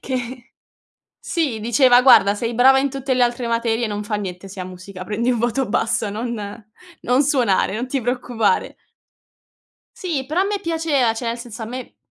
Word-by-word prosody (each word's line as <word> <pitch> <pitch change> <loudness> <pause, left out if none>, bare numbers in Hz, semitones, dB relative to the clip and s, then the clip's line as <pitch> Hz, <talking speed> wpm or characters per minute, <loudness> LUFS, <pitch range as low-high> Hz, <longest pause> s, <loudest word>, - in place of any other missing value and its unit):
che 255 -1 -5 0.7
sì, 285 -11 -2
diceva: 245 +2 +5
"Guarda, 205 -6 +6
sei 230 +2 -3
brava 265 +3 +6
in 275 +1 0
tutte 270 -1 -2
le 250 - +2
altre 240 0 0
materie, 230 0 0
non 210 -1 -4
fa 210 +1 -3
niente 195 -2 -6
se 190 0 -9
a - - -4
musica 185 +1 -9
prendi 225 +5 -1
un 240 - 0
voto 240 +2 0
basso, 220 0 0
non 235 +3 -4 0.7
non 250 +3 +3
suonare, 245 -9 +1
non 240 +3 -3
ti 270 0 -1
preoccupare." 245 -2 -1 1.2
Sì, 310 -8 -3
però 310 +6 0
a - - 0
me 405 -1 -2
piaceva, 320 - +1
cioè 235 +2 -6
nel 230 +1 -2
senso 235 -1 -8
a - - -2
me, 250 +3 -8
240 Hz, 185 wpm, -21 LUFS, 220-265 Hz, 1.2 s, Guarda